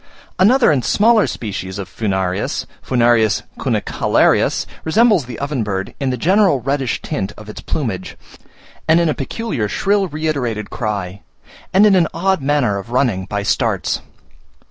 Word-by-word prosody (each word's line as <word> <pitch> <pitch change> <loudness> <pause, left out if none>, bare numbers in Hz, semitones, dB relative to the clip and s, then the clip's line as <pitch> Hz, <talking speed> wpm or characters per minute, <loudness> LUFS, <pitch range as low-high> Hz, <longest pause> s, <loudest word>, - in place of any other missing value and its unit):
Another 235 +5 +5
and 135 -5 +1
smaller 220 0 +3
species 95 -3 -5
of 100 -2 -5
Furnarius 95 -4 -2 0.2
(F. 120 -4 +2 0.2
cunicularius), - - +1 0.2
resembles 210 - +3
the 120 -2 -8
oven 140 -2 -2
bird 100 -1 -3
in 135 -2 -1
the 125 - -1
general 185 - +3
reddish 135 0 -2
tint 95 +2 -3
of 105 - -11
its 105 - -8
plumage, 110 - -4 0.7
in 160 - +6
a 155 - +1
peculiar 145 - -3
shrill 200 - +1
reiterated 140 - -3
cry, 100 -4 -4 0.5
and 195 +3 +5
in 210 - +5
an 175 -3 +4
odd 190 0 +1
manner 135 -8 +1
of 100 - -10
running 120 -7 0
by 100 0 -3
starts. - - 0
130 Hz, 145 wpm, -18 LUFS, 105-165 Hz, 0.7 s, in